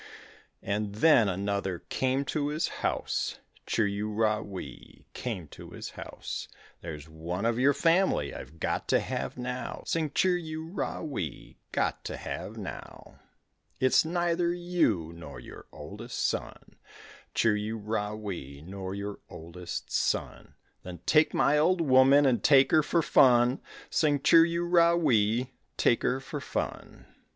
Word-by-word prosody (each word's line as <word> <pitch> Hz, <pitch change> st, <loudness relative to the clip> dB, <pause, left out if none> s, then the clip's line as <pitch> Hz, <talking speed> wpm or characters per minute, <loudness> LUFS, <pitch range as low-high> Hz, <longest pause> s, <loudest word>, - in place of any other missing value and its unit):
And 100 Hz, 0 st, -2 dB
then 115 Hz, -4 st, +5 dB
another 95 Hz, -1 st, -2 dB
came 130 Hz, +1 st, 0 dB
to 145 Hz, 0 st, -1 dB
his 150 Hz, +2 st, -1 dB
house, -, -, -1 dB, 0.3 s
Chir 110 Hz, -, +2 dB
u 100 Hz, +1 st, -3 dB
ra 105 Hz, 0 st, +1 dB
wee, 100 Hz, -3 st, -10 dB
came 100 Hz, -10 st, -5 dB
to -, -, -11 dB
his -, -, -7 dB
house; -, -, -7 dB, 0.3 s
"There's 75 Hz, -3 st, -7 dB
one 85 Hz, +5 st, -4 dB
of 115 Hz, +1 st, +1 dB
your 140 Hz, +2 st, +4 dB
family 165 Hz, -, +2 dB
I've 80 Hz, +5 st, -10 dB
got -, -, -2 dB
to -, -, +3 dB
have -, -, -4 dB
now, 125 Hz, 0 st, -5 dB
Sing 160 Hz, -2 st, 0 dB
chir 180 Hz, +4 st, +2 dB
u 160 Hz, 0 st, -5 dB
ra 180 Hz, -, -4 dB
wee, 115 Hz, -, -6 dB
got -, -, -1 dB
to -, -, -4 dB
have -, -, -6 dB
now. -, -, -9 dB, 0.6 s
"It's 130 Hz, 0 st, +4 dB
neither 175 Hz, +1 st, 0 dB
you 170 Hz, -, 0 dB
nor 80 Hz, -4 st, -9 dB
your -, -, -12 dB
oldest -, -, -5 dB
son, -, -, -4 dB, 0.6 s
Chir 115 Hz, -2 st, +3 dB
u 110 Hz, +2 st, -3 dB
ra 105 Hz, -1 st, -3 dB
wee, 85 Hz, -10 st, -7 dB
nor 95 Hz, +1 st, -6 dB
your 100 Hz, 0 st, -5 dB
oldest 85 Hz, +2 st, -7 dB
son." -, -, -2 dB, 0.3 s
"Then 90 Hz, -2 st, -9 dB
take 150 Hz, 0 st, +4 dB
my 150 Hz, -, +3 dB
old 175 Hz, +4 st, +3 dB
woman 135 Hz, -1 st, +5 dB
and 125 Hz, -3 st, +2 dB
take 135 Hz, -2 st, +6 dB
her 155 Hz, -, +6 dB
for 165 Hz, +2 st, +1 dB
fun, 125 Hz, -1 st, +5 dB, 0.3 s
Sing 150 Hz, -2 st, +2 dB
chir 165 Hz, +4 st, +6 dB
u 170 Hz, +1 st, -1 dB
ra 170 Hz, -1 st, +5 dB
wee, 120 Hz, -5 st, +2 dB, 0.3 s
take 120 Hz, -, +3 dB
her 130 Hz, -, 0 dB
for 135 Hz, +2 st, -6 dB
fun." -, -, -5 dB
125 Hz, 150 wpm, -29 LUFS, 100-155 Hz, 0.6 s, take